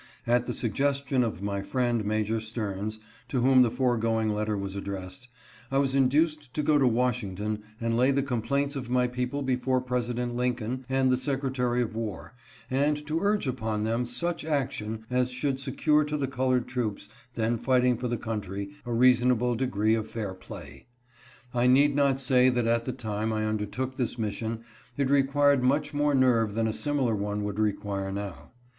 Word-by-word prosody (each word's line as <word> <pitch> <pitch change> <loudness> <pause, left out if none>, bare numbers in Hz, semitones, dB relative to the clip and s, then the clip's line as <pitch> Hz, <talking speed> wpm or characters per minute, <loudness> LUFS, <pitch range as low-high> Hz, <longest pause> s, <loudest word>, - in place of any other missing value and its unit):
At 120 +1 +2
the - - -2
suggestion 135 +2 0
of 110 -4 -3
my 100 -1 -2
friend, 120 +1 0
Major 110 +1 0
Stearns, 110 -1 -4 0.3
to 130 - -1
whom 130 +1 +6
the 125 - +5
foregoing 115 -3 +1
letter 105 0 -1
was 100 -1 -4
addressed, 100 +3 -6 0.4
I 135 - 0
was 135 -1 +2
induced 145 +1 +2
to 150 - 0
go 150 0 +4
to 135 - +4
Washington 110 -4 -1 0.2
and 115 -1 0
lay 125 +3 +4
the 140 0 +2
complaints 140 +3 -1
of 130 -3 -5
my 125 0 +3
people 125 +3 -2
before 130 0 +1
President 125 -1 -2
Lincoln 125 0 -2
and 130 -1 +2
the 125 - +3
Secretary 130 -3 0
of 110 - -5
War 115 0 -5 0.3
and 145 +3 0
to 155 +2 -1
urge 205 0 +1
upon 110 -5 -2
them 115 +2 0
such 170 +9 -2
action 125 -7 -2
as 125 0 +2
should 130 +1 -2
secure 150 +3 +2
to 150 0 -2
the 140 - 0
colored 130 -1 0
troops 110 -5 -3 0.3
then 115 +1 0
fighting 125 -1 +3
for 125 +2 -3
the 120 0 -1
country 100 -3 -4 0.2
a - - -3
reasonable 125 0 +4
degree 110 -3 +1
of 110 -1 -1
fair 105 -4 -4
play. 70 - -11 0.7
I 120 0 +2
need 140 +3 +5
not 140 -2 +3
say 130 -1 +4
that 120 -2 +1
at 115 0 +1
the 130 - -1
time 110 -3 -3
I 110 0 -1
undertook 110 +5 -3
this 125 -1 -2
mission 110 +1 -3 0.3
it 140 -1 +1
required 140 0 +4
much 145 +4 +1
more 145 0 +2
nerve 115 -5 +3
than 115 0 +1
a 110 - 0
similar 140 -3 0
one 105 0 -2
would 105 0 -3
require 100 -2 -1
now. 95 -8 -6
125 Hz, 180 wpm, -28 LUFS, 110-135 Hz, 0.7 s, whom